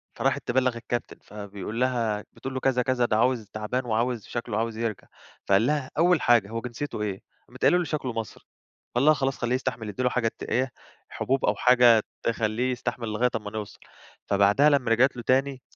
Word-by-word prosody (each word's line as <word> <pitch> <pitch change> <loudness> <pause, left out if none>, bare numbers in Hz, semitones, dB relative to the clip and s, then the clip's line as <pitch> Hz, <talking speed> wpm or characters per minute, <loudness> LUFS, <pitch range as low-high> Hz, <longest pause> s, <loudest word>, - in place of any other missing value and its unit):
فراحت 135 -1 -1
تبلّغ 125 -1 +1
الcaptain، 120 +1 -4
فبيقول 105 +2 -6
لها 115 -5 0
بتقول 135 0 -7
له: 130 - -2
"كذا 130 -2 +2
كذا 125 -1 +1
ده 110 -2 +1
عاوز 120 -3 +1
تعبان 115 +4 -2
وعاوز 115 -1 -1
شكله 120 -3 -3
عاوز 115 0 -2
يرجع" 115 -3 -3 0.4
فقال 100 +4 +4
لها: 145 -3 -1
"أول 175 0 +4
حاجة 115 -4 +4
هو 115 0 -4
جنسيته 125 -1 -5
إيه؟" 100 -3 -3 0.3
قامت - - -15
قايله 180 - +5
له: 180 - +1
"شكله 145 -6 -3
مصري" 115 -1 -6 0.5
قال 130 +4 +2
لها: 155 - +7
"خلاص 135 -2 -1
خليه 120 +1 0
يستحمل 125 -4 -3
ادّي 125 +5 -3
له 125 - +3
حاجة 120 -2 0
ت - - -7
إيه 130 +1 0 0.4
حُبوب 135 0 -1
أو - - +2
حاجة 120 -3 +5 0.2
تخلّيه 115 +2 0
يستحمل 120 -2 -3
لغاية 120 +4 +1
أمّا 105 -1 -4
نوصَل" 105 -2 -7 0.5
فبعدها 100 +9 +4
لمّا 130 -5 +2
رجعت 130 +3 +4
له 120 - -7
تاني، 135 0 +1
120 Hz, 195 wpm, -26 LUFS, 110-130 Hz, 0.5 s, لها